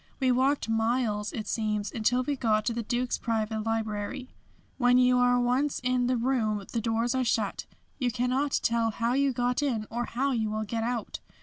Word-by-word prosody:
We 260 -2 +3
walked 265 +2 +2
miles, 225 -2 0
it 215 - -5
seems, 210 -2 -1
until 245 +3 +1
we 290 +2 -1
got 220 -5 +1
to 235 - 0
the 235 - -2
Duke's 245 +2 -1
private 220 -1 -1
library. 225 +3 -3 0.5
When 245 -1 +5
you 250 0 +4
are 245 0 +4
once 255 +4 +1
in 250 -1 +1
the 255 0 +1
room 225 -5 0
the 230 - -1
doors 230 +2 0
are 260 -1 +1
shut. 220 -4 -1 0.3
You 250 -3 +1
cannot 255 +4 0
tell 230 -1 +2
how 230 +2 -1
you 275 +1 +2
got 245 +2 0
in 240 -7 -1
or 240 +1 -2
how 270 +5 -1
you 225 -4 0
will 215 0 -2
get 225 +2 -3
out. 235 -1 -3
240 Hz, 195 wpm, -28 LUFS, 220-250 Hz, 0.5 s, When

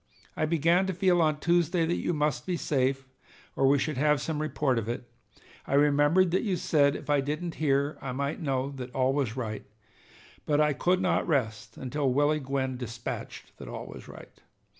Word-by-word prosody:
I 155 - 0
began 170 +4 +2
to 190 - -2
feel 180 -2 +3
on 155 -2 +1
Tuesday 170 0 +2
that 170 +2 0
you - - 0
must 150 -6 -1
be 180 -2 0
safe, 135 -2 0 0.5
or 135 - +3
we 140 +1 +5
should 150 0 -2
have 150 +1 +3
some 150 +1 -3
report 140 -4 0
of 115 0 -5
it. 120 0 -4 0.6
I 140 - 0
remembered 145 +5 +4
that 185 - +2
you 200 -5 0
said 145 -4 +2
if - - -8
I 145 -1 +3
didn't 155 +5 -3
hear, 140 0 +1
I 135 - -4
might 140 +5 -3
know 135 -2 -1 0.2
all 130 0 +2
was 135 -4 -1
right, 110 -4 -4 0.8
but 145 -1 +2
I 150 -1 +3
could 180 +7 +1
not 185 - +1
rest 110 - -1
until 135 +1 -1
Willie 145 +3 +2
Gwyn 130 -2 -2
dispatched 115 -1 -7
that - - -9
all - - -6
was - - -11
right. - - -13
145 Hz, 190 wpm, -28 LUFS, 130-160 Hz, 0.8 s, we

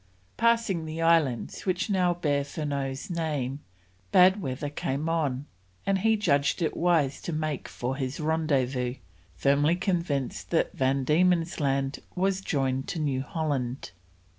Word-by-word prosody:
Passing 230 -8 +2
the 155 +1 -5
islands 165 - +1
which 185 -1 0
now 180 -4 +2
bear 145 -4 0
Furneaux's 140 -2 -3
name, 150 -5 -2 0.5
bad 185 +3 +6
weather 140 -1 -3
came 145 +1 -2
on, 145 -5 0 0.4
and 195 -1 +2
he 220 +2 +3
judged 145 -3 +2
it 160 - -1
wise 165 -6 +2
to - - -4
make 155 -3 -2
for 130 +2 -4
his 130 +1 -3
rendezvous, 135 -6 0 0.4
firmly 145 +4 +3
convinced 170 -8 -2
that 165 - +1
Van 135 +1 +1
Diemen's 170 +4 +2
Land 135 -1 0 0.2
was 190 +1 +1
joined 135 -6 -1
to 180 - -3
New 140 -4 0
Holland. 135 - -3
150 Hz, 140 wpm, -27 LUFS, 135-175 Hz, 0.5 s, bad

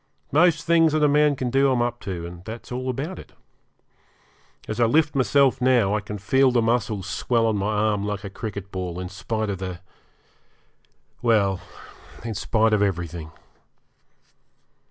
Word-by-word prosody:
Most 160 +1 +4
things 165 -2 +4
that 155 -1 +2
a - - +6
man 150 0 +3
can 125 -2 -3
do 135 +1 +3
I'm 125 - +1
up 120 0 -3
to, 90 -4 -5
and 85 0 -10
that's 115 +5 -9
all 130 +1 -3
about 145 +9 -4
it. - - -13 1.3
As 110 - -4
I 120 - +5
lift 145 +5 +2
myself 135 -1 +3
now 125 -6 +3
I 105 - 0
can 105 +1 -6
feel 130 +7 +3
the 125 -1 +2
muscle 115 -3 0
swell 115 +4 0
on 110 -1 +1
my 100 +2 -1
arm 105 -1 +1
like 105 0 -3
a 100 - -5
cricket 100 -2 -6
ball, 90 -2 -4
in 90 0 -5
spite 110 +2 -3
of 95 - -5
the 95 -2 -5 1.4
well, 100 -6 +2 0.6
in 115 - -3
spite 110 +2 +1
of 105 - +3
everything. 85 -5 -2
110 Hz, 170 wpm, -24 LUFS, 100-130 Hz, 1.4 s, a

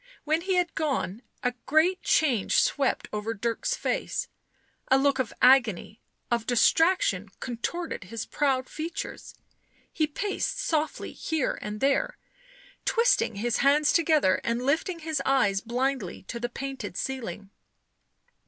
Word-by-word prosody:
When 310 +2 +1
he 375 +1 0
had 355 -1 +1
gone, 265 - -2 0.2
a 250 -1 +1
great 340 +6 +3
change 255 -10 +2
swept 275 -2 +1
over 210 +2 -2
Dirk's 235 - -1
face; - - -2 0.6
a 265 - +5
look 275 0 +2
of 250 -3 -1
agony, 240 -5 +4 0.3
of 235 -2 0
distraction 245 - +3
contorted 255 - -4
his 225 +4 -5
proud 265 -3 0
features, 325 +2 -6 0.6
he 310 -2 +1
paced 405 +9 -2
softly 315 -11 -1
here 315 -5 -2
and 210 0 -5
there, 275 0 +1 0.7
twisting 465 - +2
his 235 +4 0
hands 290 +2 +4
together 310 - +3
and 235 +2 -1
lifting 320 +5 +1
his 315 -1 -2
eyes 205 -8 +2
blindly 245 -4 -2
to 235 - -6
the 240 +1 -2
painted 255 -8 -6
ceiling. 210 -7 -5
265 Hz, 130 wpm, -27 LUFS, 230-315 Hz, 0.7 s, a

